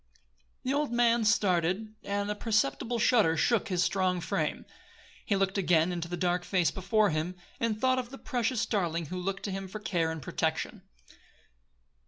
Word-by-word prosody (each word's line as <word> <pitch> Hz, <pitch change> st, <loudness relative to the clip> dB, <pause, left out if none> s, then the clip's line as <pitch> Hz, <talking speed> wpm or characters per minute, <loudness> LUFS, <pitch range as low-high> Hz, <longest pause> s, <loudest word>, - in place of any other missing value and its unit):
The 260 Hz, -, 0 dB
old 290 Hz, -2 st, 0 dB
man 235 Hz, -1 st, +3 dB
started 195 Hz, 0 st, +1 dB
and 200 Hz, +1 st, -2 dB
a -, -, +1 dB
perceptible 215 Hz, -, 0 dB
shudder 215 Hz, -8 st, +3 dB
shook 225 Hz, +8 st, +2 dB
his 180 Hz, -3 st, +1 dB
strong 185 Hz, -2 st, +1 dB
frame. -, -, -2 dB, 0.6 s
He 205 Hz, -, +2 dB
looked 195 Hz, +1 st, +1 dB
again 175 Hz, -2 st, +3 dB
into 170 Hz, -1 st, -3 dB
the 175 Hz, +1 st, -4 dB
dark 175 Hz, 0 st, 0 dB
face 180 Hz, -3 st, +1 dB
before 200 Hz, +1 st, +2 dB
him, 160 Hz, +4 st, -2 dB, 0.2 s
and 225 Hz, -2 st, 0 dB
thought 260 Hz, +1 st, +2 dB
of 245 Hz, -2 st, -5 dB
the 270 Hz, -, -9 dB
precious 245 Hz, -3 st, -1 dB
darling 170 Hz, -6 st, -1 dB
who 180 Hz, -, -3 dB
looked 195 Hz, +2 st, -3 dB
to 200 Hz, -, -3 dB
him 195 Hz, 0 st, -4 dB
for 215 Hz, +3 st, -7 dB
care 175 Hz, -6 st, 0 dB
and 160 Hz, 0 st, -4 dB
protection. 135 Hz, -, -2 dB
195 Hz, 175 wpm, -29 LUFS, 175-225 Hz, 0.6 s, man